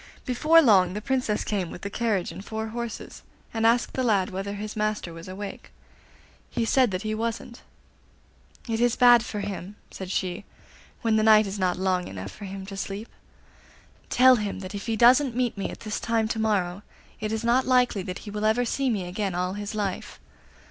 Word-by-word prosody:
Before 310 Hz, +6 st, +5 dB
long 190 Hz, -7 st, +5 dB
the -, -, -2 dB
Princess 250 Hz, -2 st, -1 dB
came 195 Hz, -5 st, -2 dB
with 175 Hz, -, -10 dB
the 200 Hz, -, -3 dB
carriage 210 Hz, -7 st, 0 dB
and 180 Hz, +4 st, -9 dB
four 220 Hz, +1 st, -4 dB
horses, 235 Hz, 0 st, -6 dB, 0.3 s
and 225 Hz, 0 st, +2 dB
asked 235 Hz, +1 st, +2 dB
the 260 Hz, -, -1 dB
lad 205 Hz, -7 st, +2 dB
whether 195 Hz, +2 st, -4 dB
his 210 Hz, +1 st, -6 dB
master 215 Hz, -5 st, -2 dB
was 165 Hz, +1 st, -10 dB
awake. 195 Hz, +2 st, -8 dB, 0.8 s
He 230 Hz, -, -1 dB
said 255 Hz, +1 st, +3 dB
that 185 Hz, +1 st, -3 dB
he 215 Hz, 0 st, -2 dB
wasn't. 230 Hz, +1 st, -4 dB, 1.1 s
'It 225 Hz, -1 st, -1 dB
is 245 Hz, -1 st, +3 dB
bad 245 Hz, -2 st, +7 dB
for 210 Hz, -3 st, -4 dB
him,' 200 Hz, 0 st, -6 dB, 0.2 s
said 190 Hz, -1 st, -7 dB
she, 185 Hz, +1 st, -2 dB, 0.6 s
'when 225 Hz, -1 st, +3 dB
the -, -, +3 dB
night 215 Hz, 0 st, +6 dB
is 200 Hz, +1 st, -5 dB
not 185 Hz, -1 st, +1 dB
long 185 Hz, -1 st, 0 dB
enough 95 Hz, 0 st, -7 dB
for 205 Hz, -, -10 dB
him 195 Hz, 0 st, -7 dB
to 195 Hz, 0 st, -8 dB
sleep. 200 Hz, +3 st, -5 dB, 1.0 s
Tell 255 Hz, 0 st, +6 dB
him 205 Hz, -3 st, -3 dB
that 185 Hz, +1 st, -7 dB
if 200 Hz, +3 st, -6 dB
he 225 Hz, -, 0 dB
doesn't 245 Hz, +3 st, +5 dB
meet 245 Hz, -2 st, 0 dB
me 200 Hz, -, -3 dB
at -, -, -9 dB
this 215 Hz, -1 st, -3 dB
time 230 Hz, -1 st, 0 dB
to 225 Hz, -, -2 dB
morrow 200 Hz, -4 st, 0 dB, 0.4 s
it 215 Hz, 0 st, -3 dB
is 220 Hz, +1 st, -2 dB
not 245 Hz, +3 st, +2 dB
likely 250 Hz, -5 st, +3 dB
that 180 Hz, +2 st, -7 dB
he 205 Hz, -, -7 dB
will 210 Hz, +1 st, -4 dB
ever 230 Hz, +3 st, +2 dB
see 270 Hz, +3 st, 0 dB
me 200 Hz, -6 st, -1 dB
again 190 Hz, 0 st, -3 dB
all 180 Hz, +1 st, -1 dB
his 205 Hz, +1 st, -5 dB
life. 200 Hz, -3 st, -3 dB
215 Hz, 205 wpm, -26 LUFS, 195-230 Hz, 1.1 s, bad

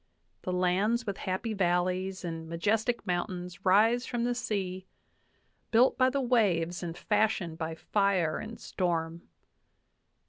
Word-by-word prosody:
The 185 Hz, -, -3 dB
lands 190 Hz, +6 st, +1 dB
with 200 Hz, -2 st, -3 dB
happy 205 Hz, +5 st, -2 dB
valleys 185 Hz, 0 st, 0 dB
and 165 Hz, -1 st, -5 dB
majestic 215 Hz, +8 st, 0 dB
mountains 180 Hz, -1 st, -3 dB
rise 225 Hz, +6 st, +4 dB
from 240 Hz, -1 st, -2 dB
the 245 Hz, 0 st, +1 dB
sea, 190 Hz, -5 st, -3 dB, 0.8 s
built 240 Hz, +3 st, +4 dB
by 255 Hz, 0 st, +4 dB
the 275 Hz, +1 st, -1 dB
waves 185 Hz, -9 st, +1 dB
and 170 Hz, -1 st, -5 dB
fashioned 205 Hz, -6 st, 0 dB
by 160 Hz, 0 st, -3 dB
fire 190 Hz, -4 st, +1 dB
and 225 Hz, +1 st, -8 dB
storm. 170 Hz, -2 st, -2 dB
185 Hz, 130 wpm, -29 LUFS, 175-220 Hz, 0.8 s, rise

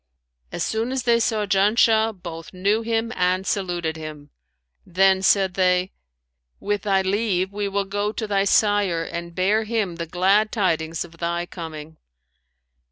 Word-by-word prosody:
As -, -, -3 dB
soon 225 Hz, +3 st, -1 dB
as 260 Hz, -2 st, -2 dB
they 235 Hz, -1 st, +3 dB
saw 220 Hz, -2 st, 0 dB
Janshah, 220 Hz, +2 st, +3 dB
both 165 Hz, -1 st, -8 dB
knew 200 Hz, +4 st, +1 dB
him 230 Hz, +1 st, -1 dB
and 185 Hz, +1 st, +1 dB
saluted 175 Hz, -5 st, -2 dB
him; 150 Hz, -2 st, -9 dB, 0.5 s
then 190 Hz, +1 st, +3 dB
said 190 Hz, -1 st, +3 dB
they, 180 Hz, 0 st, +1 dB, 0.7 s
'With 205 Hz, 0 st, -2 dB
thy 195 Hz, -2 st, +1 dB
leave, 190 Hz, -1 st, 0 dB
we 205 Hz, 0 st, -2 dB
will 200 Hz, 0 st, -1 dB
go 205 Hz, +2 st, -2 dB
to 220 Hz, -, -4 dB
thy 200 Hz, -1 st, +1 dB
sire 200 Hz, -5 st, +2 dB
and 170 Hz, +1 st, -7 dB
bear 205 Hz, +4 st, +2 dB
him 215 Hz, -6 st, -2 dB
the 170 Hz, -1 st, -4 dB
glad 195 Hz, +5 st, +2 dB
tidings 165 Hz, -6 st, -1 dB
of 165 Hz, -1 st, -17 dB
thy 170 Hz, 0 st, -2 dB
coming.' 160 Hz, -3 st, -9 dB
195 Hz, 155 wpm, -23 LUFS, 175-210 Hz, 0.7 s, they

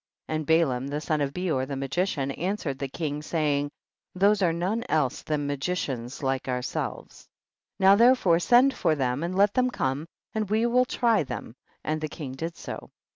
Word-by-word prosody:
30. 155 Hz, -, -2 dB
And 155 Hz, -1 st, -2 dB
Balaam 140 Hz, -6 st, +2 dB
the 145 Hz, +1 st, -2 dB
son 155 Hz, 0 st, -1 dB
of 140 Hz, -1 st, 0 dB
Beor 155 Hz, -6 st, -1 dB
the 140 Hz, -, -4 dB
magician 140 Hz, +1 st, -1 dB
answered 165 Hz, -4 st, -3 dB
the 140 Hz, -, -2 dB
king, 150 Hz, +1 st, -3 dB
saying, 150 Hz, -2 st, 0 dB, 0.5 s
these 200 Hz, +2 st, +3 dB
are 175 Hz, -3 st, +3 dB
none 185 Hz, +8 st, -1 dB
else 145 Hz, -5 st, +1 dB
than 150 Hz, -2 st, -2 dB
ma 145 Hz, -, -1 dB
gicians 135 Hz, -5 st, -3 dB
like 135 Hz, 0 st, -1 dB
ourselves. 125 Hz, -1 st, -4 dB, 0.5 s
31. 190 Hz, -, +3 dB
Now -, -, +8 dB
therefore 230 Hz, -8 st, +5 dB
send 250 Hz, +8 st, +5 dB
for 155 Hz, -, +1 dB
them, 130 Hz, -1 st, -1 dB
and 175 Hz, +2 st, -2 dB
let 200 Hz, +1 st, +4 dB
them 255 Hz, 0 st, +2 dB
come 140 Hz, -, -2 dB, 0.3 s
and 215 Hz, -2 st, -2 dB
we 220 Hz, +2 st, +2 dB
will 250 Hz, +1 st, +3 dB
try 235 Hz, -3 st, +2 dB
them, 130 Hz, -5 st, -6 dB, 0.3 s
and 155 Hz, 0 st, -2 dB
the 155 Hz, -, -1 dB
king 145 Hz, -3 st, -6 dB
did 165 Hz, +6 st, -5 dB
so. -, -, -7 dB
155 Hz, 190 wpm, -26 LUFS, 140-190 Hz, 0.5 s, Now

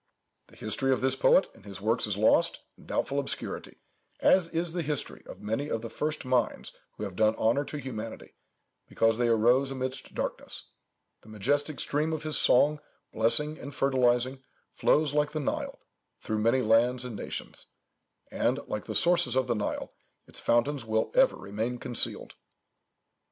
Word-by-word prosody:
The -, -, -19 dB
history 135 Hz, 0 st, -1 dB
of 130 Hz, -, +1 dB
this 130 Hz, 0 st, +1 dB
poet 185 Hz, -, +4 dB
and 110 Hz, -, -19 dB
his 100 Hz, -1 st, -9 dB
works 110 Hz, +3 st, +1 dB
is 100 Hz, -2 st, -2 dB
lost 110 Hz, -, +3 dB
in -, -, -18 dB
doubtful 140 Hz, +1 st, -1 dB
obscurity, 140 Hz, -, -5 dB, 0.4 s
as 185 Hz, -3 st, +4 dB
is 165 Hz, 0 st, -2 dB
the 175 Hz, -, -1 dB
history 150 Hz, -3 st, -3 dB
of -, -, -11 dB
many 115 Hz, +8 st, -2 dB
of 115 Hz, -, -2 dB
the 115 Hz, -, -6 dB
first 150 Hz, -1 st, -3 dB
minds 125 Hz, -3 st, 0 dB, 0.3 s
who -, -, -5 dB
have 100 Hz, -3 st, -5 dB
done 110 Hz, +2 st, +3 dB
honour 115 Hz, +6 st, +2 dB
to 150 Hz, -, -6 dB
humanity, 115 Hz, -5 st, -7 dB, 0.5 s
because 115 Hz, 0 st, +1 dB
they 120 Hz, -1 st, +2 dB
rose 120 Hz, +4 st, +4 dB
amidst 130 Hz, 0 st, -5 dB
darkness. -, -, -4 dB, 0.5 s
The 110 Hz, -, -17 dB
majestic 145 Hz, +8 st, 0 dB
stream 155 Hz, +3 st, 0 dB
of 155 Hz, -, -3 dB
his 155 Hz, -1 st, -1 dB
song, 150 Hz, +4 st, +4 dB, 0.3 s
blessing 150 Hz, +8 st, +2 dB
and 140 Hz, -1 st, -8 dB
fertilizing, 130 Hz, -1 st, +2 dB, 0.3 s
flows 150 Hz, -1 st, +2 dB
like 150 Hz, 0 st, +1 dB
the 155 Hz, -, -1 dB
Nile, 145 Hz, -, -3 dB, 0.4 s
through 110 Hz, 0 st, -2 dB
many 115 Hz, +4 st, +2 dB
lands 120 Hz, +3 st, +3 dB
and 120 Hz, -3 st, -6 dB
nations; -, -, -6 dB, 0.6 s
and, -, -, +1 dB
like -, -, -4 dB
the -, -, -5 dB
sources 175 Hz, -5 st, +3 dB
of 130 Hz, -1 st, +2 dB
the 120 Hz, -, 0 dB
Nile, 105 Hz, -2 st, -3 dB, 0.3 s
its -, -, -9 dB
fountains 135 Hz, +4 st, +1 dB
will 110 Hz, 0 st, 0 dB
ever -, -, +4 dB
remain 110 Hz, +5 st, -4 dB
concealed." 120 Hz, -1 st, -3 dB
130 Hz, 165 wpm, -28 LUFS, 115-145 Hz, 0.6 s, poet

